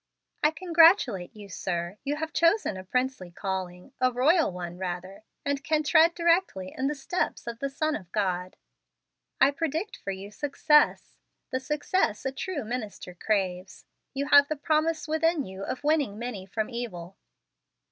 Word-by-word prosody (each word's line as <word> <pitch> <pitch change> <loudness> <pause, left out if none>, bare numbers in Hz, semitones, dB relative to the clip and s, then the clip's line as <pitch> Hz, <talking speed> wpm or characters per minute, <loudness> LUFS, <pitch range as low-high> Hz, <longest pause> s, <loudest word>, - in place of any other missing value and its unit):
"I 300 - +5
congratulate 325 - +4
you, 205 -1 -10
sir. 180 0 -4
You 285 +2 -1
have 320 +1 -4
chosen 335 - +3
a 185 - -7
princely 250 -2 -2
calling, 185 +4 -5
a 255 0 +4
royal 295 - +3
one, 175 -1 -7
rather, 185 +2 -5 0.2
and 280 -1 -1
can 310 0 +1
tread 325 +3 +5
directly 335 - +1
in 265 - 0
the 295 - -1
steps 290 +6 -2
of 235 -1 -6
the 275 - -2
Son 310 +2 -1
of 180 -4 -9
God. 185 -3 -1 0.8
I 270 +1 +6
predict 325 - -3
for - - -7
you 195 +1 -5
success, 295 +4 +2 0.3
the 260 - 0
success 300 - -1
a 265 - 0
true 310 +1 -4
minister 215 -6 -5
craves. 185 -1 -2 0.3
You 280 +1 -2
have 285 -1 +7
the 310 - -2
promise 310 +2 0
within 315 -1 +1
you 190 +1 -9
of 255 +7 -4
winning 290 -9 +1
many 220 -5 -5
from 215 +2 -2
evil." 195 -7 -6
255 Hz, 160 wpm, -27 LUFS, 190-310 Hz, 0.8 s, have